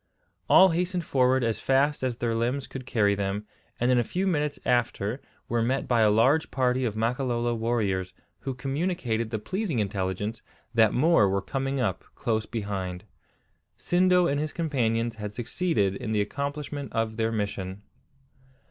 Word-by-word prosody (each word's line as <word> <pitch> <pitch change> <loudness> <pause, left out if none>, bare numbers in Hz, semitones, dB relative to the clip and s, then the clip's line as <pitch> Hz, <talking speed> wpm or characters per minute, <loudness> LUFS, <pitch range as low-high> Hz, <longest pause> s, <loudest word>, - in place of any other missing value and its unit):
All 190 0 +8
hastened 175 0 -1
forward 130 -1 +3
as 115 -2 0
fast 140 +3 +2
as 125 -3 -1
their 120 -2 -1
limbs 120 +4 -1
could 130 -1 -8
carry 105 -5 +2
them, 100 +1 -2 0.3
and 120 +1 +2
in 125 - +4
a - - +2
few 185 - -2
minutes 150 -5 0
after 120 -1 0 0.3
were 120 0 0
met 130 +4 0
by 120 -2 +3
a 110 - +5
large 130 +9 +3
party 130 -1 +1
of 110 -3 -2
Makololo 120 +1 0
warriors, 110 -5 -1 0.3
who 135 -1 -4
communicated 135 -4 -1
the 110 - -2
pleasing 185 - -2
intelligence 100 +1 -2 0.3
that 110 -2 +5
more 135 - +4
were 100 +1 +1
coming 135 +6 -2
up 110 -8 -1
close 110 -1 -1
behind. 95 -5 -4 0.7
Sindo 180 0 +3
and 140 -3 +1
his 155 0 -3
companions 120 -8 0
had 105 -1 -5
succeeded 115 - 0
in 110 +1 -4
the 105 - +2
accomplishment 140 +4 -4
of 110 -1 -1
their 115 0 +1
mission. 100 -2 -3
120 Hz, 160 wpm, -27 LUFS, 110-140 Hz, 0.7 s, All